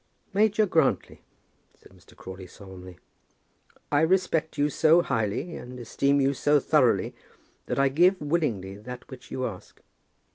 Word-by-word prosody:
"Major 215 +1 +3
Grantly," 160 -7 0 0.5
said - - -21
Mr. - - -20
Crawley, 95 0 -10
solemnly, 95 -2 -12 0.9
"I 145 0 +3
respect 165 -2 +1
you 145 - +2
so 160 +3 +4
highly, 110 - -2
and 125 +1 -9
esteem 140 +4 0
you 135 0 +2
so 145 +2 +2
thoroughly, 135 -4 +2 0.5
that - - -2
I 140 0 +3
give 180 +7 +3
willingly 125 - -2
that 125 +4 -10
which 130 -1 -11
you 130 - -3
ask. 95 -6 -8
140 Hz, 140 wpm, -26 LUFS, 110-160 Hz, 0.9 s, so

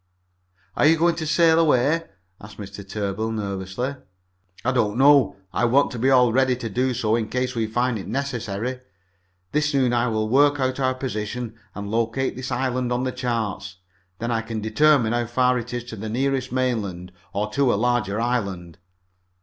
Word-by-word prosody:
"Are - - +4
you 165 +1 +5
going 170 +1 +3
to 160 -2 -3
sail 165 0 +4
away?" 155 +1 +3 0.4
asked 105 +1 -12
Mr. 100 -1 -8
Tarbill 100 +2 -3
nervously. 100 +5 -3 0.7
"I 130 - +3
don't 115 -4 0
know. 140 -2 +5 0.2
I 120 - +1
want 135 +4 +3
to 120 - -6
be 130 +3 +2
all 125 -3 +5
ready 130 0 +3
to 120 -2 -5
do 125 +4 0
so 110 -2 +1
in 115 -2 -2
case 125 0 -1
we 115 -2 -1
find 120 +1 0
it - - -8
necessary. 125 -1 -3 0.7
This 150 -1 +1
noon 130 -3 +2
I 120 0 +2
will 110 -2 0
work 145 +4 +4
out 130 0 -1
our 130 -1 +1
position 120 -2 -4 0.2
and 100 0 -5
locate 115 +4 0
this 130 +1 -6
island 125 -1 -1
on 125 +1 0
the 130 - -1
chart. 115 -6 -3 0.4
Then 115 +1 -3
I 115 -1 0
can 115 -1 -5
determine 115 +2 +3
how 120 -1 0
far 125 +1 +2
it 120 0 -7
is 120 -1 -3
to 120 -2 -8
the 110 +1 -6
nearest 130 +2 -1
mainland, 105 -9 -2 0.2
or 105 +2 -2
to 135 +1 +2
a - - +2
larger 110 -2 0
island." 100 -8 -2
120 Hz, 185 wpm, -23 LUFS, 110-130 Hz, 0.7 s, you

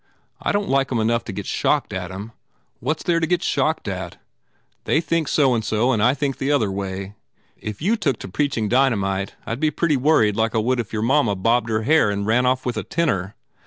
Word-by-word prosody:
I - - 0
don 205 0 +1
t - - -8
like 135 0 +1
em 120 - +1
enough 115 +1 +1
to - - -5
get 100 0 -6
shocked - - 0
at - - -4
em. 100 +4 -7 0.5
What 155 - -1
s - - -9
there 170 -2 +2
to 160 - 0
get 175 0 0
shocked 155 -2 0
at? 95 -3 -5 0.7
They 155 - +2
think 165 -1 0
so 135 -4 +3
and 115 -2 0
so 110 +4 +1
and 110 -5 +1
I 125 +4 +4
think 140 -2 -2
the 135 +2 0
other 115 -9 +2
way. 95 0 -5 0.4
If 105 +4 -7
you 215 +6 +3
took 140 - 0
to - - -6
preaching 120 +1 -1
dynamite 100 -6 +1
I - - -3
d 120 - -5
be 155 0 +2
pretty 150 0 +1
worried 125 -7 +3
like 110 +1 0
I - - +3
would 120 +3 +1
if 115 - -4
your 110 -1 -2
mamma 120 -4 +2
bobbed 115 +4 +1
her 110 0 0
hair 155 -2 +4
and 100 0 -2
ran 120 +4 +2
off 130 0 0
with 125 - -2
a - - -2
tenor. 100 - -1
120 Hz, 240 wpm, -22 LUFS, 105-145 Hz, 0.7 s, I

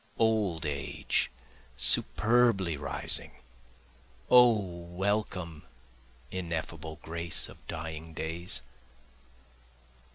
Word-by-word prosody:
Old 105 -8 +1
age 70 -2 -1 0.5
superbly 110 -7 +4
rising! 70 -1 -2 1.0
O 125 -2 +8
welcome, 90 -2 -3 0.7
ineffable 80 -3 -5
grace 85 +1 -1
of - - -16
dying 80 0 -6
days! 80 -3 -3
85 Hz, 65 wpm, -30 LUFS, 80-100 Hz, 1.0 s, O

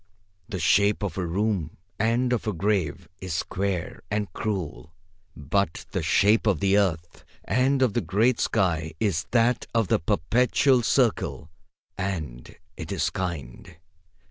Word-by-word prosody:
The - - -3
shape 100 +6 +3
of 100 - -3
a 90 -3 -2
room 95 -3 -1 0.2
and 120 +3 +1
of 115 - -2
a 105 - 0
grave 95 -4 -1
is 95 -3 -4
square 95 0 -3
and 105 0 -2
cruel, 90 -5 -4 0.4
but 80 +5 -1
the - - -1
shape 110 +3 +3
of 95 -7 +2
the 100 0 +2
earth 85 -5 0 0.2
and 130 +1 +2
of 120 -6 +2
the 120 - +1
great 115 +6 +2
sky 80 -7 0
is 95 -7 0
that 120 +1 +2
of 115 -4 +2
the - - +3
perpetual 125 - +2
circle, 115 - 0 0.5
and 80 -11 -4 0.2
it 80 -3 -7
is - - 0
kind. 85 -1 -6
100 Hz, 145 wpm, -25 LUFS, 85-110 Hz, 0.5 s, shape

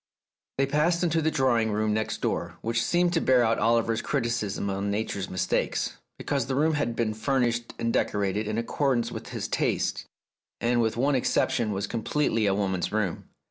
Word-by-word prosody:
They 135 - +3
passed 155 +5 +1
into 165 -1 +2
the 160 - +2
drawing 130 -7 +2
room 105 0 +1
next 110 0 -2
door, - - -2
which 115 +1 0
seemed 175 +6 +2
to 165 - +2
bear 130 -2 +4
out 115 0 +2
Oliver's 115 0 +2
criticism 115 -7 -1
on 100 +1 -2
Nature's 100 -2 -2
mistakes, 90 -1 -1 0.2
because 140 -5 -1
the 130 - -1
room 155 +3 +2
had 130 -6 -1
been 115 -2 0
fur 135 +5 0
nished 120 -1 +1
and 115 0 -1
decorated 105 +1 0
in 110 0 -2
accordance 120 +1 0
with - - -7
his - - -4
tastes, - - -1 0.5
and 120 0 +2
with 110 0 0
one 140 +4 +2
exception 120 -3 +1
was 100 0 -2
completely 115 0 0
a 95 - +2
woman's 95 -3 -1
room. 105 -5 -2
115 Hz, 180 wpm, -27 LUFS, 105-135 Hz, 0.5 s, bear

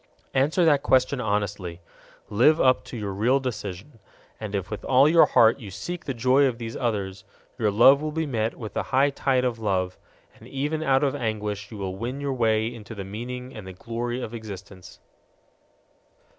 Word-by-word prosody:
Answer 150 +6 +2
that 145 -3 +4
question 130 0 +2
honestly. 100 -5 -2 0.5
Live 130 +10 +4
up 130 -1 +4
to 120 - -7
your 105 -3 -3
real 120 +8 +2
decision. 110 -1 -6 0.4
And 105 -2 -5
if 95 0 -3
with 105 - -5
all 135 +2 +5
your 165 +2 +6
heart 115 +3 +5
you 105 -6 -8
seek 170 - -6
the 135 - -3
joy 130 +4 +4
of 125 -3 -2
these 115 -1 -6
others, 100 -5 -2 0.4
your 110 -2 +2
love 125 +7 +6
will 155 0 -2
be 160 +1 -1
met 115 -5 -1
with 110 -4 -8
the - - -1
high 140 +2 +3
tide 130 -2 +1
of 120 -2 -1
love, 95 -4 -1 0.4
and - - -14
even 150 +3 -2
out 135 -3 +2
of 140 - +1
anguish 105 -3 -3
you 110 - -9
will 95 -2 -4
win 120 +7 -4
your 140 -1 -2
way 110 -3 +2
into 115 -1 -7
the 100 - -5
meaning 125 +5 -6
and 105 -3 -8
the 95 - -8
glory 120 +5 -4
of 120 -2 -6
existence. 100 -4 -9
115 Hz, 190 wpm, -25 LUFS, 105-135 Hz, 0.5 s, your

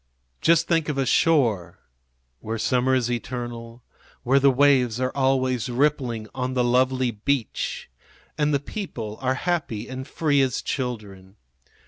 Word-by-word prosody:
Just 165 0 +3
think 165 -3 +1
of 145 - -2
a 135 - +1
shore 120 - +2 0.6
where 110 +7 -4
summer 125 +4 +1
is 120 -2 0
eternal, 120 -1 -5 0.4
where 135 +3 +4
the 140 0 +5
waves 130 -3 +3
are 130 0 0
always 130 -3 +1
rippling 125 -4 0
on 130 0 -3
the 125 - +2
lovely 130 +1 +2
beach 115 +3 -2 0.5
and 150 -1 +1
the 140 - +2
people 120 - -6
are 130 0 +1
happy 155 -9 -2
and 130 0 -7
free 145 -3 +1
as 130 -3 0
children. 105 -7 -5
130 Hz, 140 wpm, -24 LUFS, 120-140 Hz, 0.6 s, the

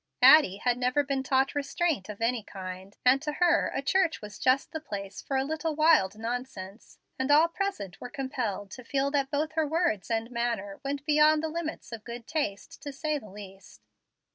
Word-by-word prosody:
Addie 290 -12 +8
had 245 +2 0
never 255 +3 +2
been 275 -1 -1
taught 265 0 +1
restraint 285 - -1
of 210 +1 -8
any 235 0 +1
kind, 190 -1 -9
and 260 +2 +5
to 300 0 -3
her 340 +1 +3
a 270 - -2
church 365 +3 +2
was 210 -1 -10
just 260 +1 +2
the 315 - -4
place 200 -9 -7
for 270 - -2
a 265 - +2
little 315 +2 -2
wild 305 - +4
nonsense, 225 -3 -6 0.2
and 260 +1 -1
all 305 +3 +6
present 335 - -4
were 245 - -6
compelled 245 -8 -4
to 255 - -9
feel 275 +2 0
that 280 -2 0
both 305 +2 -1
her 315 -1 0
words 315 - 0
and 225 +1 -1
manner 235 -5 -2
went 280 +1 -3
beyond 305 0 +4
the 320 - -1
limits 320 -3 -5
of 225 -2 -7
good 235 -1 -8
taste, 275 -8 -3
to 285 0 -6
say 300 +2 -2
the 215 - -13
least. 195 0 -12
265 Hz, 195 wpm, -28 LUFS, 215-305 Hz, 0.2 s, Addie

